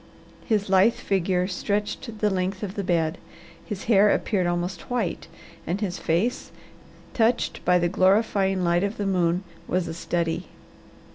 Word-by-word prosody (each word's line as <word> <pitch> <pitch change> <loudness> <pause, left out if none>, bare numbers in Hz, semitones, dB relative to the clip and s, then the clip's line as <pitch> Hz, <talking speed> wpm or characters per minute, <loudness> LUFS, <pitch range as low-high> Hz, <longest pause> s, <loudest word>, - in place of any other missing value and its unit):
His 210 -4 +1
lithe 195 +5 +4
figure 185 -5 0
stretched 210 +4 -3
the 210 -1 +3
length 190 +1 -2
of 195 -2 -4
the 200 - -3
bed, 165 -3 0 0.4
his 205 -4 -6
hair 210 -2 +5
appeared 195 -3 +1
almost 175 0 -3
white, 245 -7 -2 0.4
and 180 +5 -1
his 195 -4 -3
face, 180 +10 0 0.6
touched 230 +1 +1
by 180 0 +5
the 175 -1 +2
glorifying 195 0 +2
light 175 +1 +2
of 200 +2 -2
the 205 - -2
moon, 180 -1 +1 0.2
was 185 0 0
a 165 - -4
study. 170 0 -2
190 Hz, 150 wpm, -25 LUFS, 175-205 Hz, 0.6 s, hair